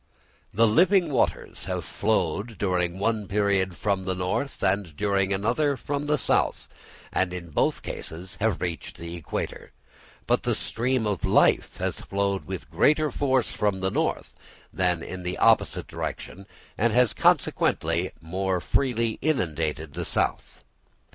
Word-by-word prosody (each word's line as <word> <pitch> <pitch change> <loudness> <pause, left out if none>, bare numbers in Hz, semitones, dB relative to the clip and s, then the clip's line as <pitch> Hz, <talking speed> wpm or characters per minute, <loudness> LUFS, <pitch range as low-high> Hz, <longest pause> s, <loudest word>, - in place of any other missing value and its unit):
The 115 +4 +4
living 175 - +4
waters 125 - -1
have - - -3
flowed 110 0 -1
during 90 -2 0
one 105 0 0
period 100 -3 +1
from 100 -2 -1
the 95 0 -1
north 110 +10 -2
and 95 -5 0
during 100 -1 +1
another 125 +9 +1
from 145 +2 -3
the 150 0 +2
south, - - +1 0.5
and 95 -1 +1
in 85 -2 -7
both - - +1
cases 90 +2 -6
have 110 -5 +1
reached 85 -2 -4
the 85 0 -7
equator; 85 -4 -5 0.5
but - - +2
the - - 0
stream 125 0 0
of 100 -4 -2
life - - +3
has - - -2
flowed 100 -4 -1
with - - -6
greater 155 0 +3
force 130 -3 +1
from 100 -3 0
the 95 0 0
north - - -1 0.4
than 90 -3 +1
in 95 - -6
the 90 0 -3
opposite - - +3
direction, 95 +2 -6 0.3
and 115 +1 +2
has 125 -2 +4
consequently 85 +3 +2
more 90 +3 -1
freely 115 +1 0
inundated 80 - -1
the - - -3
south. - - -1
100 Hz, 145 wpm, -26 LUFS, 90-115 Hz, 0.5 s, The